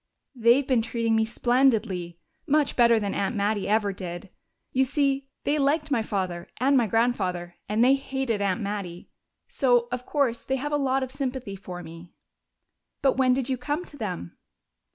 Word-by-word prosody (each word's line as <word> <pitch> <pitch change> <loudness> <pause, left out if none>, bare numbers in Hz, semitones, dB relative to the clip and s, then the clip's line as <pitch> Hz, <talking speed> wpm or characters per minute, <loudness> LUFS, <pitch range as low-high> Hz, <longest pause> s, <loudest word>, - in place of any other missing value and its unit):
"They've 245 +2 +4
been 255 -4 +2
treating 230 0 0
me 220 0 +3
splendidly! 225 -8 +1 0.3
Much 295 -1 +2
better 235 -2 +5
than 200 -2 -2
Aunt 200 +5 -1
Mattie 205 0 0
ever 210 -1 +1
did. 180 0 -7 0.4
You 265 - +4
see, 275 0 0 0.2
they 295 +1 +1
liked 295 +2 +1
my 240 -5 +2
father 185 -5 -3
and 270 +4 +3
my 240 -4 +3
grandfather, 185 -7 0
and 215 +2 +2
they 260 +2 +6
hated 265 -5 -2
Aunt 200 +3 0
Mattie. 200 -4 -5 0.4
So 245 -3 +2
of 250 0 -4
course 270 -6 0
they 265 - -1
have 290 +3 -3
a - - +2
lot 270 -2 +1
of 260 - -5
sympathy 260 -6 -4
for 180 -2 -8
me." 165 +1 -11 0.9
"But 270 -2 +3
when 255 -1 +4
did 260 -2 -1
you 260 -2 -1
come 295 +7 -2
to - - -11
them?" 180 - -5
235 Hz, 175 wpm, -26 LUFS, 200-265 Hz, 0.9 s, they